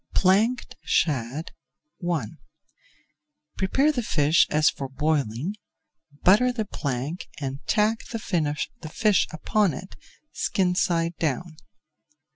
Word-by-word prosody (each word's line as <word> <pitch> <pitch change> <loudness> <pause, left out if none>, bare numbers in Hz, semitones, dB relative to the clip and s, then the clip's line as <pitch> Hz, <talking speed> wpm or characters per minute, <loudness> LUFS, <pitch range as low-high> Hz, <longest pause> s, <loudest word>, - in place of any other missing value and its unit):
PLANKED 215 +7 +2
SHAD 140 0 0 0.6
I 155 -9 0 1.3
Prepare 270 +11 +2
the 260 -5 -1
fish 155 -6 +3
as 150 0 +3
for 135 -1 0
boiling, 145 - -1 0.7
butter 215 +7 +5
the 225 -3 -2
plank, 145 -2 -4
and 135 -1 -4
tack 220 +1 +2
the 230 - -4 0.7
fish 210 0 +3
upon 180 +1 +1
it, 185 +7 -9 0.4
skin 185 -2 +1
side 170 -1 +1
down. 160 +2 -2
170 Hz, 100 wpm, -25 LUFS, 145-210 Hz, 1.3 s, butter